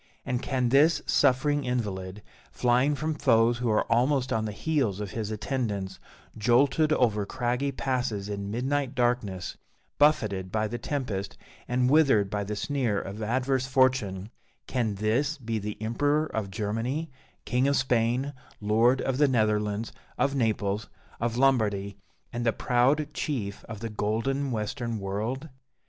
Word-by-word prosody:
And 125 Hz, -1 st, -1 dB
can 130 Hz, -3 st, 0 dB
this 150 Hz, +4 st, +4 dB
suffering 145 Hz, +2 st, +2 dB
invalid, 105 Hz, -6 st, -3 dB, 0.3 s
flying 125 Hz, +4 st, +2 dB
from 155 Hz, +2 st, -2 dB
foes 120 Hz, -4 st, +3 dB
who 120 Hz, -1 st, 0 dB
are 110 Hz, -, +3 dB
almost 130 Hz, +3 st, +2 dB
on 110 Hz, -1 st, 0 dB
the 105 Hz, -, -3 dB
heels 110 Hz, -3 st, -1 dB
of 105 Hz, -2 st, -4 dB
his 110 Hz, -2 st, -3 dB
attendants, 105 Hz, -3 st, -3 dB, 0.4 s
jolted 130 Hz, +8 st, +3 dB
over 110 Hz, -7 st, +2 dB
craggy 125 Hz, +6 st, -1 dB
passes 125 Hz, -7 st, -2 dB
in 100 Hz, -1 st, -4 dB
midnight 135 Hz, +4 st, -1 dB
darkness, 120 Hz, -7 st, -1 dB, 0.4 s
buffeted 105 Hz, -11 st, +2 dB
by 110 Hz, +1 st, 0 dB
the 120 Hz, +3 st, -5 dB
tempest, 110 Hz, -9 st, -3 dB, 0.3 s
and 125 Hz, 0 st, +1 dB
withered 135 Hz, -9 st, +4 dB
by 105 Hz, -1 st, -1 dB
the 105 Hz, +1 st, -4 dB
sneer 120 Hz, -3 st, 0 dB
of 100 Hz, +3 st, -7 dB
adverse 130 Hz, +3 st, 0 dB
fortune 125 Hz, -7 st, +1 dB, 0.3 s
can 115 Hz, -5 st, -1 dB
this 120 Hz, +9 st, 0 dB
be 115 Hz, -4 st, -3 dB
the 105 Hz, +1 st, -5 dB
Emperor 145 Hz, +8 st, +1 dB
of 110 Hz, -9 st, -3 dB
Germany, 115 Hz, +10 st, -2 dB, 0.3 s
King 125 Hz, +2 st, +1 dB
of 140 Hz, -, +2 dB
Spain, 125 Hz, +2 st, +1 dB, 0.3 s
Lord 115 Hz, +5 st, +3 dB
of 135 Hz, 0 st, -1 dB
the 145 Hz, -, +5 dB
Netherlands, 105 Hz, -3 st, 0 dB, 0.2 s
of 140 Hz, 0 st, +1 dB
Naples, 110 Hz, -5 st, 0 dB, 0.3 s
of 115 Hz, 0 st, -1 dB
Lombardy, 105 Hz, -7 st, +2 dB, 0.4 s
and 120 Hz, 0 st, -2 dB
the 115 Hz, -, +3 dB
proud 140 Hz, +5 st, +1 dB
chief 110 Hz, -12 st, -3 dB
of 110 Hz, -2 st, -8 dB
the 115 Hz, -, -3 dB
golden 115 Hz, +7 st, -1 dB
Western 115 Hz, 0 st, -3 dB
World? 110 Hz, +9 st, -3 dB
120 Hz, 145 wpm, -27 LUFS, 105-135 Hz, 0.4 s, the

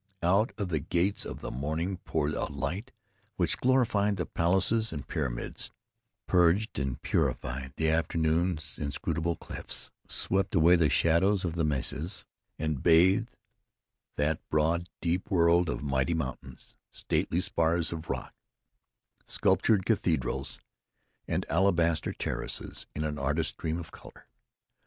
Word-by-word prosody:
Out 100 Hz, +7 st, +3 dB
of 100 Hz, -4 st, -2 dB
the 80 Hz, -3 st, 0 dB
gates 90 Hz, +6 st, 0 dB
of -, -, -7 dB
the -, -, -5 dB
morning 80 Hz, +8 st, -2 dB
poured 75 Hz, -4 st, -1 dB
a -, -, -1 dB
light 95 Hz, -, -4 dB, 0.4 s
which 85 Hz, -, +1 dB
glorified 115 Hz, -6 st, +2 dB
the 90 Hz, -, -1 dB
palaces 95 Hz, +6 st, +2 dB
and 75 Hz, -3 st, -6 dB
pyramids, -, -, -3 dB, 0.5 s
purged 90 Hz, +1 st, +3 dB
and 65 Hz, -2 st, -2 dB
purified 65 Hz, +1 st, -1 dB
the 80 Hz, -, 0 dB
afternoon's 80 Hz, 0 st, +1 dB
inscrutable 80 Hz, +3 st, -2 dB
clefts, -, -, -5 dB, 0.2 s
swept 95 Hz, 0 st, 0 dB
away 85 Hz, +1 st, +6 dB
the 80 Hz, -3 st, +3 dB
shadows 95 Hz, +4 st, +3 dB
of 85 Hz, -, -2 dB
the 85 Hz, -1 st, -1 dB
mesas, 75 Hz, +4 st, -2 dB, 0.3 s
and 80 Hz, -3 st, -2 dB
bathed 95 Hz, +7 st, +5 dB, 0.9 s
that 75 Hz, +2 st, +1 dB
broad, 85 Hz, +3 st, +1 dB
deep 90 Hz, +3 st, -1 dB
world 85 Hz, -2 st, +4 dB
of -, -, -3 dB
mighty 70 Hz, +3 st, +1 dB
mountains, 75 Hz, -6 st, -6 dB
stately 85 Hz, -, -1 dB
spars 85 Hz, -2 st, +1 dB
of 80 Hz, 0 st, -7 dB
rock, -, -, -4 dB, 0.9 s
sculptured 105 Hz, -5 st, +2 dB
cathedrals -, -, 0 dB, 0.7 s
and -, -, -1 dB
alabaster 85 Hz, -4 st, +2 dB
terraces -, -, -4 dB
in 75 Hz, -, -2 dB
an 75 Hz, -1 st, -3 dB
artist's 75 Hz, +4 st, 0 dB
dream 80 Hz, 0 st, -2 dB
of 85 Hz, -2 st, -8 dB
color. -, -, -14 dB
85 Hz, 130 wpm, -29 LUFS, 75-95 Hz, 0.9 s, away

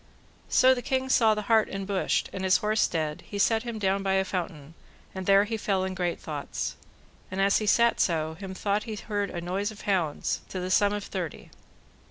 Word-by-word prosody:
So 260 Hz, 0 st, +6 dB
the 250 Hz, -, -3 dB
king 265 Hz, +1 st, -1 dB
saw 225 Hz, -4 st, +4 dB
the 210 Hz, -, -3 dB
hart 220 Hz, 0 st, +3 dB
enbushed, 195 Hz, 0 st, -1 dB
and 190 Hz, -, -4 dB
his 185 Hz, -1 st, +4 dB
horse 215 Hz, +1 st, +1 dB
dead, 155 Hz, -3 st, -2 dB
he 205 Hz, -, -5 dB
set 220 Hz, +2 st, +3 dB
him 235 Hz, -1 st, -5 dB
down 195 Hz, -1 st, +1 dB
by 195 Hz, 0 st, 0 dB
a 190 Hz, 0 st, +2 dB
fountain, 165 Hz, -5 st, -5 dB, 0.4 s
and 190 Hz, -1 st, -6 dB
there 195 Hz, 0 st, +6 dB
he 220 Hz, +2 st, -3 dB
fell 195 Hz, -3 st, 0 dB
in 190 Hz, 0 st, -2 dB
great 180 Hz, -2 st, -2 dB
thoughts. 150 Hz, -2 st, -4 dB, 0.5 s
And 185 Hz, -, -5 dB
as 195 Hz, +1 st, +4 dB
he 215 Hz, -, -3 dB
sat 235 Hz, +2 st, +4 dB
so, 160 Hz, -2 st, +1 dB
him 190 Hz, +2 st, -8 dB
thought 205 Hz, +2 st, -1 dB
he 220 Hz, -, -5 dB
heard 205 Hz, -1 st, -3 dB
a 175 Hz, -, -5 dB
noise 185 Hz, +4 st, -2 dB
of 215 Hz, -1 st, -10 dB
hounds, 175 Hz, -7 st, -1 dB
to 185 Hz, -, -4 dB
the 180 Hz, +1 st, -3 dB
sum 205 Hz, +1 st, +4 dB
of 205 Hz, -1 st, -3 dB
thirty. 180 Hz, -7 st, -6 dB
195 Hz, 215 wpm, -27 LUFS, 185-215 Hz, 0.5 s, So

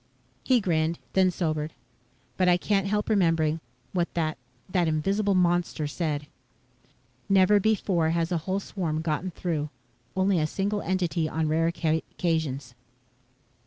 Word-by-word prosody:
He 250 Hz, -3 st, +3 dB
grinned, 165 Hz, -3 st, +1 dB, 0.2 s
then 190 Hz, -1 st, +4 dB
sobered. 155 Hz, -3 st, -2 dB, 0.6 s
"But 185 Hz, -1 st, +3 dB
I 175 Hz, -, +5 dB
can't 195 Hz, +1 st, +1 dB
help 210 Hz, +1 st, 0 dB
remembering 165 Hz, -6 st, +2 dB, 0.3 s
what 175 Hz, -2 st, 0 dB
that 155 Hz, -5 st, -1 dB, 0.3 s
that 180 Hz, -2 st, +1 dB
invisible 195 Hz, +6 st, +1 dB
monster 175 Hz, -3 st, +1 dB
said: 150 Hz, -1 st, -2 dB, 1.0 s
'_Never 195 Hz, +1 st, +5 dB
before 190 Hz, -6 st, +2 dB
has 165 Hz, +1 st, 0 dB
a 175 Hz, -, +2 dB
whole 190 Hz, +1 st, +1 dB
swarm 165 Hz, -6 st, -3 dB
gotten 160 Hz, +3 st, -1 dB
through. 160 Hz, -4 st, -2 dB, 0.5 s
Only 190 Hz, -1 st, +2 dB
a 155 Hz, -, +1 dB
single 205 Hz, +5 st, -1 dB
entity 175 Hz, -4 st, 0 dB
on 160 Hz, 0 st, -1 dB
rare 160 Hz, +2 st, +2 dB
occasions. 160 Hz, -5 st, -1 dB
170 Hz, 130 wpm, -27 LUFS, 155-190 Hz, 1.0 s, I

